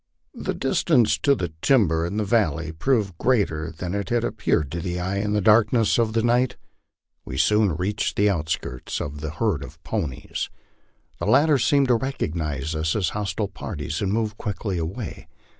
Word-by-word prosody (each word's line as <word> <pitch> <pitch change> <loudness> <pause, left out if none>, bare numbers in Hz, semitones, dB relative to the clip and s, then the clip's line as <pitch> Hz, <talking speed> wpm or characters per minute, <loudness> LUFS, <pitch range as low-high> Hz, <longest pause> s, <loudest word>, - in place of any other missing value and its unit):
The - - -3
distance 120 -3 +3
to 140 -1 +3
the 90 -9 -4
timber 85 - +3
in 100 +4 -4
the 110 - +1
val 100 -8 +2
ley 80 -1 -5
proved 100 +2 0
greater 90 -11 +1
than 85 +3 -5
it 100 -2 -2
had 120 -1 +1
appeared 75 -10 0
to 85 - -3
the 90 +1 -3
eye 95 +2 -2
in 105 +1 -1
the 105 - +2
darkness 110 +3 +4
of 110 -2 +1
the 115 -1 +1
night. 120 +1 +2 0.7
We 65 - -6
soon 100 +2 +3
reached 100 +6 -1
the 105 - +3
outskirts 80 -8 -2
of 75 0 -5
the 80 - -3
herd 80 -2 -1
of - - -10
ponies. 70 -6 -3 0.7
The - - -2
latter 150 -1 +5
seemed 140 +1 +3
to 125 - +5
recognize 80 - -3
us 80 +1 0
as 95 -6 +1
hostile 105 0 -2
parties 80 -3 -5
and 100 -1 0
moved 110 0 -1
quickly 100 -3 -3
away. 95 +8 -5
100 Hz, 180 wpm, -24 LUFS, 80-110 Hz, 0.7 s, latter